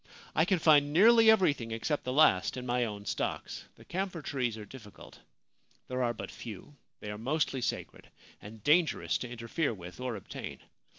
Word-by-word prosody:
I 160 - +3
can 185 +1 +2
find 150 -3 +4
nearly 225 +7 +6
everything, 155 - +3
except 115 +7 -2
the 125 - -2
last, 130 -8 +4
in 125 - -5
my 125 0 +1
own 105 -2 -6
stocks; - - -3
the - - -17
camphor 180 -2 -4
trees 125 -6 -2
are 105 - -8
difficult. 105 -2 -13 0.7
There 130 0 -2
are 120 -1 +1
but - - -7
few; 115 +6 -10 0.3
they 105 - -5
are 105 - -7
mostly 135 +1 -1
sacred, - - -4 0.3
and 105 0 -11
dangerous 160 +3 +2
to 125 - -5
interfere 120 +3 -2
with 90 0 -11
or 125 -2 -3
obtain. 100 - -7
125 Hz, 175 wpm, -30 LUFS, 110-155 Hz, 0.7 s, nearly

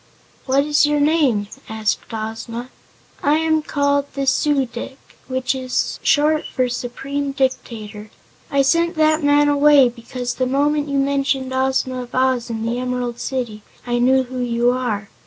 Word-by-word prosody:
"What 270 +1 +3
is 295 0 +3
your 295 0 +1
name?" 285 -9 +2 0.2
asked 220 +1 -2
Ozma. 225 +2 -5 0.5
"I 290 +1 +3
am 315 -1 +1
called 285 -1 0
the 275 -1 -1
Su 275 0 +2
dic, 245 +2 -8 0.3
which 260 -1 -1
is 255 -1 -2
short 305 +1 +3
for 255 -1 +1
Supreme 275 +3 -4
Dictator. 220 -5 -3 0.4
I 280 -3 +2
sent 335 +5 +2
that 310 0 +2
man 290 0 +4
away 290 -2 +5
because 245 +1 -5
the 255 - -1
moment 290 +2 +1
you 280 - 0
mentioned 275 -1 0
Ozma 260 -1 0
of 245 0 -9
Oz, 255 -2 +1
and 225 0 -3
the 240 +1 -1
Emerald 250 -1 -3
City, 240 -5 -4 0.2
I 240 0 0
knew 260 +2 +4
who 255 0 -7
you 240 0 +1
are. 235 -5 -2
260 Hz, 155 wpm, -20 LUFS, 245-285 Hz, 0.5 s, away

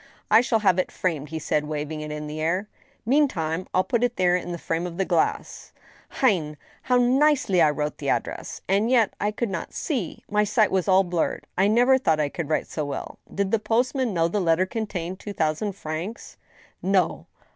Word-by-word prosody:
" - - -32
I 220 +2 +8
shall 225 -3 +1
have 185 -1 +4
it 185 - -1
framed," 155 -5 -2
he 160 - -4
said, 150 -1 -1
waving 155 0 -4
it 150 - -6
in 150 0 -5
the 150 +1 -5
air. 180 +6 0 0.4
Mean 285 +5 +4
time, 165 - -3
I'll 185 - +2
put 235 +1 0
it 245 0 +1
there 180 -1 +3
in 175 0 -3
the 170 - -3
frame 165 +1 -2
of 170 -1 -8
the 195 - +1
glass.... 170 -3 -1 0.5
Hein 170 - +2
/ - - -29
how 250 -1 +2
nicely 255 - +3
I 155 - +6
wrote 150 0 -3
the - - -2
address - - -3
!— - - -41
and 200 +4 +2
yet 235 -5 +3
I 205 - +2
could 215 0 -3
not 170 - -5
see; 245 - -3
my 210 0 +2
sight 210 0 +2
was 190 -1 0
all 190 0 +5
blurred. 175 -2 -2
I 190 +2 +3
never 245 +5 +4
thought 160 -11 +2
I 150 -1 +1
could 160 0 -5
write 155 - +1
so 155 - -4
well. 145 -1 -6
Did 200 -1 -1
the 225 - +3
post 235 +4 +1
man 260 -4 0
know 165 -3 +2
the 200 +4 -1
letter 170 +1 +3
contained 190 -3 -4
two 205 - -7
thousand 160 +4 -1
francs? 170 +5 -6 0.2
" - - -27
" - - -44
No." 190 -2 +1
185 Hz, 230 wpm, -24 LUFS, 160-220 Hz, 0.5 s, I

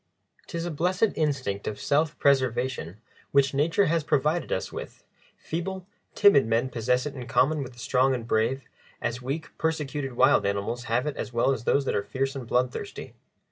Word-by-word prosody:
'Tis 170 -1 -4
a 175 - -3
blessed 180 +7 +1
instinct 130 -10 -1
of 105 - -4
self 150 +2 +1
preservation 130 - +1 0.3
which 140 -1 +3
nature 165 +8 +2
has 165 0 +1
provided 150 +3 +1
us 95 - -2
with; - - -8 0.3
feeble, 185 +3 -4 0.3
timid 200 - +6
men 115 +3 +1
possess 125 +2 0
it 150 - -4
in 125 -3 -7
common 150 +2 +2
with 130 -2 -7
the - - -20
strong 130 +4 +2
and 115 -2 -6
brave, 115 +5 +1 0.4
as 120 +1 -3
weak, 140 +5 -5
persecuted 150 -4 -2
wild - - +4
animals 100 +5 -2
have 120 +2 0
it 150 - -2
as - - -4
well 120 +3 +3
as 125 -3 -3
those 140 -1 +2
that - - 0
are - - +1
fierce 135 +5 -2
and 130 -4 -6
bloodthirsty. 125 +1 -2
135 Hz, 180 wpm, -26 LUFS, 120-150 Hz, 0.4 s, timid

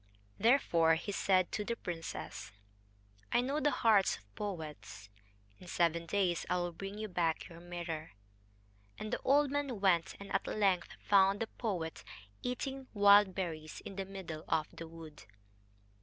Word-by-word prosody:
Therefore 170 -10 +4
he 175 +5 -4
said 185 -2 +2
to 210 - -2
the 235 +3 -2
princess: 170 -6 -6 0.8
"I 240 - +4
know 275 +4 -1
the 295 - +3
hearts 215 -8 +3
of 100 -1 -23
poets. 150 - -6 0.5
In 180 - -13
seven 170 -1 +1
days 185 -4 +1
I 180 - +2
will 175 0 -1
bring 195 +4 -7
you 215 0 -3
back 170 -4 0
your 165 -1 -11
mirror." 170 -5 -5 0.8
And 215 - -5
the - - -1
old 285 +1 +4
man 280 -6 -1
went, 180 -4 +2
and 200 - -8
at 195 - 0
length 195 -4 +1 0.2
found 195 0 +5
the 225 - 0
poet 185 -9 -4 0.4
eating 265 +2 -3
wild 205 -2 +7
berries 160 -5 -4
in 195 - -7
the 195 0 -3
middle 185 -5 -7
of 155 -2 +1
the 165 - -7
wood. 160 -2 -11
190 Hz, 155 wpm, -34 LUFS, 165-210 Hz, 0.8 s, wild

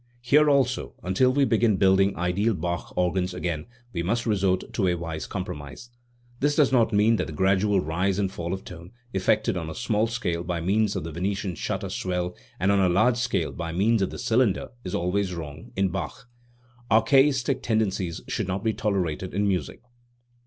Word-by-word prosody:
Here 150 +5 +5
also, 130 -3 +1
until 95 +8 +3
we 140 +1 +3
begin 115 -4 +2
building 95 0 +3
ideal 95 +5 +1
Bach 85 +1 -3
organs 90 0 0
again, 85 -3 -3 0.3
we 85 - -1
must 115 +7 -1
resort 95 -4 0
to 100 -5 +1
a 90 - +2
wise 85 -2 -5
compromise. 75 - -7 0.5
This 145 +1 +2
does 145 -4 +4
not 120 -4 +3
mean 110 +2 +4
that - - -2
the 80 - -7
gradual 95 +3 +2
rise 90 +5 0
and 100 -2 0
fall 85 -2 -4
of 95 0 -4
tone, 85 +3 -11 0.2
effected 95 +2 +1
on 80 -3 -4
a 80 - -7
small 110 -2 +1
scale 90 -8 -2
by 90 -1 -2
means 100 +4 +1
of - - -2
the 85 - -6
Venetian 95 +3 -2
shutter - - -3
swell 90 -1 -2 0.2
and 95 +3 +2
on 100 - +3
a 95 -2 +4
large 110 +7 +3
scale 120 - 0
by 85 -1 -5
means 105 +5 +2
of 95 - +1
the - - -7
cylinder, 115 -3 +1
is 90 - -4
always 90 +1 0
wrong 80 -2 -8
in 95 0 +1
Bach. 95 - -5 0.6
Archaistic 135 +3 +3
tendences 100 -6 -1
should - - -2
not 95 +1 -2
be 110 -1 +1
tolerated 95 -4 -2
in 100 +1 +1
music. 90 - -2
95 Hz, 190 wpm, -25 LUFS, 90-110 Hz, 0.6 s, Here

